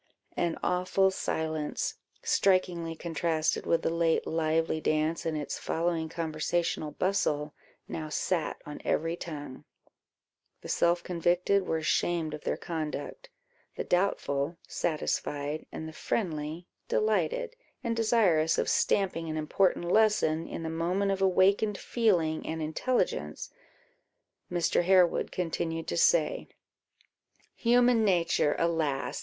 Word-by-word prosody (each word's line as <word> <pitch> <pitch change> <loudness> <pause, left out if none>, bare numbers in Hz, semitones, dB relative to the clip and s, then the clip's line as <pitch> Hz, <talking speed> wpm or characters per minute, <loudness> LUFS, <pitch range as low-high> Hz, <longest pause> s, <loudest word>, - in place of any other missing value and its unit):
An 170 -1 0
awful 185 +2 +2
silence, 160 -4 -2 0.3
strikingly 180 -4 +1
contrasted 165 -1 -1
with 165 - +2
the - - +1
late 165 -1 +1
lively 160 0 0
dance 155 +2 0
and 160 -1 -1
its 150 - -4
following 165 -1 -1
conversational 160 0 -1
bustle, 150 -3 0 0.3
now 155 -1 -5
sat 165 +2 -1
on 150 - -8
every 165 +2 0
tongue; 145 -6 -7 1.0
the - - -9
self 170 0 +2
convicted 180 +3 +1
were 160 - +1
ashamed 160 0 0
of 150 - -6
their - - -1
conduct, 165 - -5 0.5
the - - -3
doubtful 170 -4 0
satisfied, 150 -1 -2
and 160 - -6
the 160 - -8
friendly 160 -3 -3 0.2
delighted; - - 0 0.3
and 230 -2 -1
desirous 210 -9 +3
of - - 0
stamping 165 -5 +1
an 155 - -3
important 175 +4 +1
lesson, 175 -5 +2
in 165 - -6
the 160 - -3
moment 180 +5 0
of 195 0 -2
awakened 195 +2 +3
feeling 175 -11 +1
and 160 - -3
intelligence, 160 +11 -1 1.0
Mr. 175 -1 +2
Harewood 180 -1 +3
continued 165 -2 -2
to - - -2
say 170 -1 +3 1.1
"Human 240 -1 +4
nature, 170 -6 +2
alas! 160 -5 0
165 Hz, 120 wpm, -29 LUFS, 155-190 Hz, 1.1 s, Human